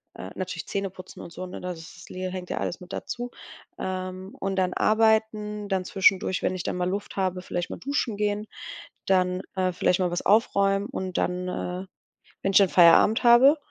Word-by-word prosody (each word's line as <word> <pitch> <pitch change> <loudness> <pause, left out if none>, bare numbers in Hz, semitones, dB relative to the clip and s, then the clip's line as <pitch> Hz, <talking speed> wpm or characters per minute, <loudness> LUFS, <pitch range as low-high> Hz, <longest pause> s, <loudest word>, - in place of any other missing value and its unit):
äh, 95 - -8
natürlich 185 -2 -5
Zähneputzen 190 -2 -5
und 170 - -9
so, 185 - -6
ne? 180 - -8
Das 180 -2 -5
ist 165 - -13
le 185 0 -4
hängt 185 -1 -6
ja - - -3
alles - - -3
mit 180 +1 -10
dazu. 245 0 -5 0.5
Ähm, 185 0 -5
und 195 0 -2
dann 185 -1 +1
arbeiten, 215 -1 +1
dann 190 -1 0
zwischendurch, 190 -1 +2
wenn 185 - 0
ich 180 - -4
dann - - -3
mal 180 0 0
Luft 200 +2 -4
habe, 185 -2 -1
vielleicht 175 -1 -4
mal - - -6
duschen 260 -6 -2
gehen, 210 0 -1 0.6
dann, 185 -1 +2
äh, 185 -1 +1
vielleicht 180 +1 +1
mal 180 -1 +1
was 175 - -2
aufräumen 200 -2 +3
und 185 -1 -4
dann, 180 0 -1
äh, 180 +1 -4 0.6
wenn 195 - 0
ich - - +5
dann 195 -3 +6
Feierabend 180 +7 +6
habe 250 +6 +7
190 Hz, 195 wpm, -26 LUFS, 180-205 Hz, 0.6 s, habe